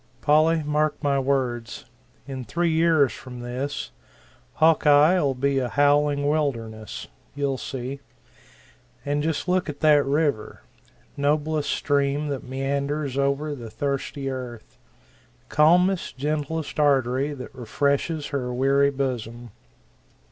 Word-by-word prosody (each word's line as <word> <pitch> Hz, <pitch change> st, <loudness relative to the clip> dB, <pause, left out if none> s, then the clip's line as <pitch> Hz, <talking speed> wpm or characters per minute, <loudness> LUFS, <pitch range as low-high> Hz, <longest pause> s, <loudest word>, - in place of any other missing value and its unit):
Polly, 155 Hz, +2 st, +3 dB
mark 150 Hz, +1 st, 0 dB
my 140 Hz, -1 st, +2 dB
words 130 Hz, -4 st, -2 dB, 0.4 s
in 130 Hz, -2 st, -6 dB
three 170 Hz, +6 st, 0 dB
years 160 Hz, -4 st, +3 dB
from 125 Hz, -2 st, -9 dB
this, 130 Hz, +4 st, -4 dB, 0.6 s
Hawkeye'll 150 Hz, -1 st, +4 dB
be 140 Hz, +1 st, +1 dB
a 125 Hz, -2 st, -2 dB
howling 145 Hz, +1 st, +2 dB
wilderness. 115 Hz, -8 st, -2 dB, 0.3 s
You'll 140 Hz, -2 st, -1 dB
see. 130 Hz, +1 st, -5 dB, 1.1 s
And 145 Hz, +1 st, 0 dB
just 155 Hz, 0 st, -2 dB
look 180 Hz, -2 st, +1 dB
at 145 Hz, -1 st, -7 dB
that 150 Hz, -2 st, +5 dB
river 140 Hz, -5 st, -1 dB, 0.5 s
noblest 150 Hz, +1 st, 0 dB
stream 145 Hz, +1 st, 0 dB
that 140 Hz, -2 st, -3 dB
meanders 140 Hz, +2 st, -2 dB
over 140 Hz, +2 st, 0 dB
the 120 Hz, -5 st, -8 dB
thirsty 140 Hz, +3 st, -3 dB
earth! 125 Hz, -3 st, -7 dB, 0.7 s
calmest, 175 Hz, +2 st, +3 dB
gentlest 150 Hz, +2 st, -3 dB
artery 140 Hz, 0 st, +2 dB
that 130 Hz, -, -9 dB
refreshes 140 Hz, +5 st, -1 dB
her 130 Hz, -3 st, -2 dB
weary 135 Hz, +3 st, +3 dB
bosom! 120 Hz, -4 st, -4 dB
140 Hz, 110 wpm, -24 LUFS, 130-150 Hz, 1.1 s, that